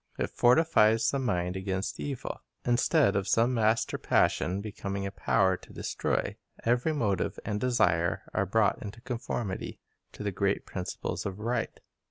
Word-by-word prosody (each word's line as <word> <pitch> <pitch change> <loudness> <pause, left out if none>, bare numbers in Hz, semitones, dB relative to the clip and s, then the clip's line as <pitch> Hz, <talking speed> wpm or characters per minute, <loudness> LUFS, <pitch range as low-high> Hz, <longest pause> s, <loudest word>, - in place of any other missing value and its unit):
It - - -2
fortifies 120 -5 +4
the 140 - 0
mind 90 -8 -1
against 95 0 -3
evil. 140 -4 -4 0.2
Instead 120 - +3
of 100 0 0
some 115 +3 +3
master 110 -1 +1
passion 90 +4 +2
becoming 100 -1 -4
a 100 - -3
power 95 -1 +2
to - - -16
destroy, - - -2 0.3
every 120 +6 +2
motive 105 - 0
and 105 -1 -1
desire 90 -9 +2
are 95 - +1
brought 105 +1 +2
into 105 +2 -7
conformity 120 -5 -4 0.3
to - - -7
the 100 - -1
great 100 +1 0
principles 90 +1 -4
of 95 -1 -5
right. 115 +4 -2
105 Hz, 150 wpm, -29 LUFS, 95-120 Hz, 0.3 s, fortifies